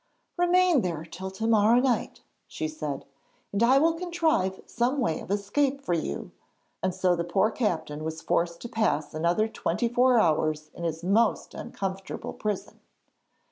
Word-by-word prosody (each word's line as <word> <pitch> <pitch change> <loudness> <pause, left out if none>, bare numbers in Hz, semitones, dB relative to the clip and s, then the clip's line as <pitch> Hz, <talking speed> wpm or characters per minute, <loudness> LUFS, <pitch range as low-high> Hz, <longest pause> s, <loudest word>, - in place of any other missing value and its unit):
'Remain 355 -4 +4
there 165 -4 -3
till 180 +4 -7
to 190 +4 -5
morrow 225 +1 +5
night,' 250 -1 0 0.3
she 155 - -3
said, 150 -3 -5 0.5
'and 200 - -1
I 250 +3 +6
will 325 +4 +4
contrive 330 - 0
some 245 +4 0
way 225 -11 0
of - - -10
escape 260 +8 0
for 275 -10 -2
you,' 155 - -3 0.5
and 185 - +1
so 185 -1 +2
the 170 - -1
poor 190 +6 +2
captain 160 -10 -2
was 160 0 -4
forced 170 0 0
to - - -5
pass 155 -11 0
another 170 +7 +1
twenty 235 +2 -1
four 245 +1 +4
hours 155 -3 +1
in 170 - -6
his 165 0 -3
most 210 +5 +2
uncomfortable 195 0 -5
prison. 210 -2 -4
200 Hz, 160 wpm, -27 LUFS, 170-245 Hz, 0.5 s, I